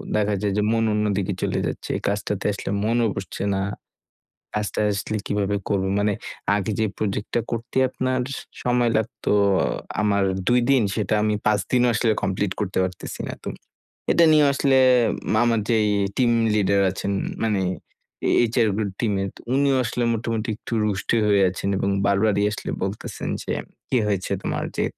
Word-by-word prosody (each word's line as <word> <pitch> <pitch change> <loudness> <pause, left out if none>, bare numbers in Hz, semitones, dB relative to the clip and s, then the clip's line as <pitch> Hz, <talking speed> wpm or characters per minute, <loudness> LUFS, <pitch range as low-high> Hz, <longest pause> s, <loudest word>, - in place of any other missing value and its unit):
দেখা 105 -1 +1
যায় 100 -2 0
যে - - +3
মন 115 0 +2
অন্যদিকে 105 -2 0
চলে - - 0
যাচ্ছে। - - -4 0.2
কাজটাতে 100 0 -2
আসলে 100 - -5
মনও 115 +1 +2
বসছে 95 0 -5
না। 95 - 0 0.9
কাজটা 105 0 -2
আসলে 105 +2 -2
কীভাবে 100 0 0
করব? 95 -1 +1
মানে 105 0 +2 0.4
আগে 105 +1 -2
যে 110 - +2
প্রজেক্টটা 105 +3 -1
করতে 115 +2 -5
আপনার 130 0 -1 0.4
সময় 120 -1 +2
লাগত 110 +2 -3 0.8
আমার 100 -1 +2 0.2
২ 125 0 +4
দিন, 130 -4 +5
সেটা 110 -1 0
আমি 105 0 +1
৫ 105 -1 +3
দিনেও 125 -1 +3
আসলে 115 +2 +2
কমপ্লিট 95 0 0
করতে 95 -2 -1
পারতেসিনা 90 -1 -4
না। - - -4
তো - - -5 0.6
এটা 170 - +5
নিয়েও 150 -2 +5
আসলে 135 -1 +3 0.7
আমার 115 -2 +2
যে 115 - +3 0.4
টিম 125 -2 +3 0.2
লিডার 100 -1 +3
আছেন 100 +1 -3 0.3
মানে 105 -4 +1 0.7
এ - - +3 0.2
HR 120 -3 +3
গুলো 105 -3 -1
টিমের, 100 -4 0
তো - - -13
উনিও 140 -1 +3
আসলে 120 +2 -2
মোটামুটি 115 0 -2
একটু 115 - -11
রুষ্টই 105 +2 0
হয়ে 100 -1 +4
আছেন 95 +1 -4
এবং 100 - 0 0.2
বারবারই 100 +1 +2
আসলে - - -5
বলতেসেন 100 +2 -4
যে, - - -3 0.4
"কী 125 - +2
হয়েছে 100 -3 -1
তোমার? - - -2
যে - - +1
105 Hz, 160 wpm, -23 LUFS, 100-115 Hz, 0.9 s, দিন